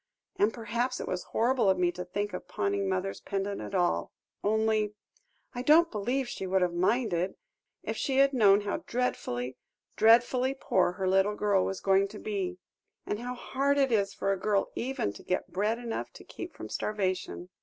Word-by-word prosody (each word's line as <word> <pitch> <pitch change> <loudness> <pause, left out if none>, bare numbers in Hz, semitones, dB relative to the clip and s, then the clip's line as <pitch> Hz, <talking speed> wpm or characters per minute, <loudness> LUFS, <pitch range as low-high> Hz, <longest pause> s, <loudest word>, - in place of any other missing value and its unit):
And 210 +2 +3
perhaps 235 +3 -2
it - - -5
was 180 - -3
horrible 240 -2 +2
of 190 - +3
me 175 -1 +2
to 180 +1 -6
think 205 +3 -3
of - - -6
pawning 200 -2 -1
mother's 190 +1 -2
pendant 200 0 -3
at - - -5
all 175 -1 +1 0.3
only 215 0 +1 0.6
I 245 - -3
don't 325 +5 +5
believe 245 +5 -1
she 190 -5 -5
would 190 0 +2
have 175 -1 0
minded, 185 -1 +1 0.5
if - - -3
she 270 -2 0
had 275 0 +5
known 205 -5 +5
how 205 0 -2
dreadfully, 125 - -2 0.4
dreadfully 245 +4 +4
poor 180 -1 +2
her 190 0 -2
little 195 +2 +3
girl 205 -3 +2
was 195 - -3
going 195 0 +3
to 210 +1 -10
be 190 -4 -3 0.5
and 210 - -2
how 245 +1 -4
hard 275 +3 0
it 270 -2 +3
is 200 -3 +2
for 195 - 0
a 195 - -4
girl 205 0 +1
even 245 - -2
to - - -11
get 185 - -2
bread 210 +4 +1
enough 235 -1 -4
to - - -12
keep - - -8
from - - -7
starvation. 185 -3 -2
205 Hz, 185 wpm, -29 LUFS, 190-240 Hz, 0.6 s, don't